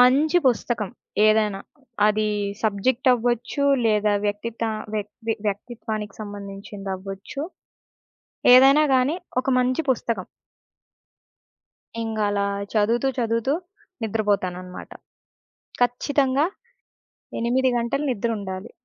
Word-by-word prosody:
మంచి 285 +7 +5
పుస్తకం, 235 -3 -1 0.4
ఏదైనా. 215 -2 +3 0.5
అది 215 0 +2 0.3
సబ్జెక్ట్ 235 +5 +2
అవ్వచ్చు, 245 +4 -1 0.2
లేదా 210 -1 +3
వ్యక్తిత 225 +3 -3 0.3
వ్యక్తి 210 +2 -3
వ్యక్తిత్వానికి 215 0 -5
సంబంధించిందవ్వచ్చు. 200 +2 -6 1.1
ఏదైనా 270 +4 +7
గాని 260 +4 +3 0.3
ఒక - - -12
మంచి 255 +3 +1
పుస్తకం. 230 -6 -1 1.8
ఇంగ 225 -1 -3
అలా 200 0 0 0.3
చదువుతూ 230 +4 +2
చదువుతూ 230 +3 +1 0.5
నిద్రపోతాననమాట. 195 -4 -2 0.9
ఖచ్చితంగా 270 +3 +2 0.9
8 255 +3 +2
గంటలు 235 +5 -1
నిద్రుండాలి. 205 -3 -3
225 Hz, 80 wpm, -24 LUFS, 205-250 Hz, 1.8 s, ఏదైనా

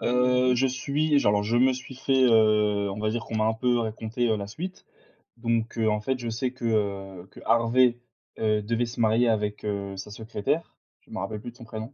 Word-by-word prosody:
Heu, 125 +1 +3
je 130 +2 +2
suis 140 +4 +1
je - - 0
alors 105 0 +3
je 115 +3 0
me 130 +2 +5
suis 130 +1 -8
fait, 135 0 +2
heu, 105 -3 +3
on 100 - -5
va 110 0 0
dire 115 +1 -3
qu'on 110 - -7
m'a 110 0 +2
un 110 - +3
peu 120 +1 +1
raconté, 115 +2 -2
heu, 110 - +2
la 100 -1 -5
suite. 180 - -7 0.5
Donc, 115 0 -1
heu, 110 -1 +1
en 105 0 0
fait, 130 +4 -1
je 120 -1 -4
sais 120 +3 -2
que, 125 -2 -8
heu, 100 -4 -2
que - - -13
Harvey, 115 +2 +3 0.4
heu, 105 -1 +1
devait 115 +3 0
se 120 - -8
marier 115 +2 +3
avec, 105 -2 -1
heu, 100 -1 -3
sa 95 +2 -7
secrétaire. 110 +8 -3 0.3
Je - - -23
m'en - - -4
rappelle 105 +3 -4
plus 120 - -7
de 120 - -22
son - - -11
prénom. 110 +3 -7
115 Hz, 230 wpm, -26 LUFS, 105-125 Hz, 0.5 s, me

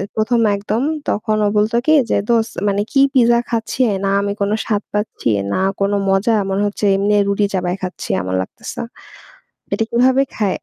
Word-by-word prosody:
১ম 225 +2 +1 0.2
একদম। 210 +4 -2 0.3
তখন 215 +1 0
ও - - +3
বলত 215 +2 +1
কি 310 - +4 0.2
যে - - +3
"দোস্ত 230 -1 +1
মানে 200 0 +1
কি 275 - +3
পিজ্জা 235 -2 +4
খাচ্ছে? 230 +2 -1 0.2
না - - +1
আমি 200 0 -2
কোন 200 +1 +1
স্বাদ 210 -2 -1
পাচ্ছি, 210 - -2 0.2
না - - 0 0.2
কোন 200 +1 +1 0.2
মজা। 200 +4 +2
মনে 195 +1 0
হচ্ছে 205 +1 -3
এমনি 205 +1 +1
রুটি 200 +1 +1
চাবাই 180 -1 -1
খাচ্ছি 185 0 -6
এমন 95 +1 -4
লাগতেছে। 95 - -7 0.9
এটা 225 - +1
কিভাবে 255 +3 +3
খায়?" 205 -4 0
210 Hz, 175 wpm, -18 LUFS, 200-230 Hz, 0.9 s, কি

